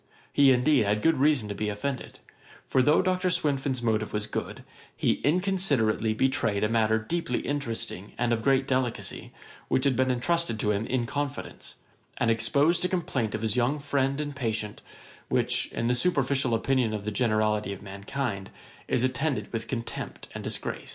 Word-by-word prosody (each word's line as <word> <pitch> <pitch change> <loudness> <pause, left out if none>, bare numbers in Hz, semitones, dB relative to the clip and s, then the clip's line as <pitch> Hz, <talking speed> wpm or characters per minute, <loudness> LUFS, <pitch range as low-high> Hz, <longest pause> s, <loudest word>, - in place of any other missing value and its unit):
He 140 -1 +6
indeed 130 +1 +4
had 105 +1 0
good 165 -4 +3
reason 140 -6 +3
to - - -2
be 105 +1 -2
offended; 125 +6 -4 0.5
for 130 - +3
though 150 +7 +4
Dr. 185 0 +1
Swinfen's 135 -6 0
motive 110 -2 0
was 105 0 0
good, 105 - -5 0.3
he - - +1
inconsiderately 145 - +1
betrayed 115 -5 +1
a 105 - +2
matter 110 -1 +3
deeply 125 +2 -2
interesting 115 -8 -3
and 120 -1 +1
of 115 - -1
great 135 +2 +2
delicacy, 130 -3 -2 0.4
which 130 - +1
had 135 -2 +3
been 130 +1 +2
entrusted 125 -1 0
to 105 - +2
him 105 +2 -1
in 125 -2 0
confidence; 140 +3 -5 0.4
and 115 - +2
exposed 140 +10 +2
a - - +3
complaint 135 - -1
of 110 - -4
his 110 -1 +1
young 125 +4 +2
friend 140 -1 0
and 145 -1 -3
patient, 110 -5 -3 0.5
which, - - +1
in 115 - -1
the 125 - +3
superficial 130 -3 +2
opinion 125 -2 +1
of 105 -1 -6
the 105 - -1
generality 110 -2 +1
of 100 0 -7
mankind, 100 +1 -4 0.4
is 120 - +1
attended 130 +2 -1
with 115 -1 -3
contempt 115 -3 -5
and - - -6
disgrace. - - -4
125 Hz, 170 wpm, -27 LUFS, 110-140 Hz, 0.5 s, He